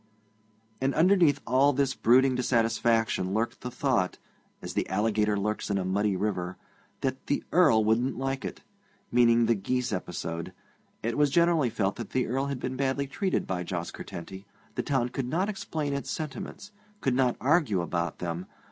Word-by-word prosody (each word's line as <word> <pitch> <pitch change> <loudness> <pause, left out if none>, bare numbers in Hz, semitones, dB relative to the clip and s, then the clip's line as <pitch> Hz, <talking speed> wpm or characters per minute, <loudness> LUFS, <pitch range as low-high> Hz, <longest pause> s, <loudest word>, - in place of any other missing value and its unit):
And 135 +1 +1
underneath 165 -4 +4
all 135 +4 +4
this 135 0 +1
brooding 130 +3 +4
dissatisfaction 115 -5 +1
lurked 115 +2 -1
the 125 - -4
thought, 125 -7 0 0.4
as - - -7
the - - -1
alligator 105 +1 +1
lurks 105 +2 -2
in 100 - +1
a 95 - -1
muddy 100 +2 +1
river, 90 -2 -2 0.4
that 130 -1 -3
'the 145 - 0
Earl 130 -12 +5
wouldn't 120 +4 +1
like 135 0 -2
it' - - -6 0.5
meaning 120 -1 +5
the 115 - +4
geese 125 +3 -1
episode. 85 -2 -4 0.5
It 115 +5 -1
was 145 -1 +4
generally 170 -3 +3
felt 100 -2 -1
that 115 -4 -6
the 130 -1 +2
Earl 135 +4 -1
had 140 -2 -3
been 130 +1 -3
badly 135 +1 0
treated 185 +8 -1
by 90 -1 -2
Jos 85 -1 -4
Curtenty. 95 +3 -8 0.3
The - - -1
town 130 -4 0
could 125 0 -3
not 180 +9 0
explain 155 -7 -3
its 140 - -3
sentiments 190 +6 -6 0.3
could 135 - +1
not 125 -1 +2
argue 135 - +2
about 85 -1 -2
them. 85 +1 -4
125 Hz, 170 wpm, -28 LUFS, 105-140 Hz, 0.5 s, Earl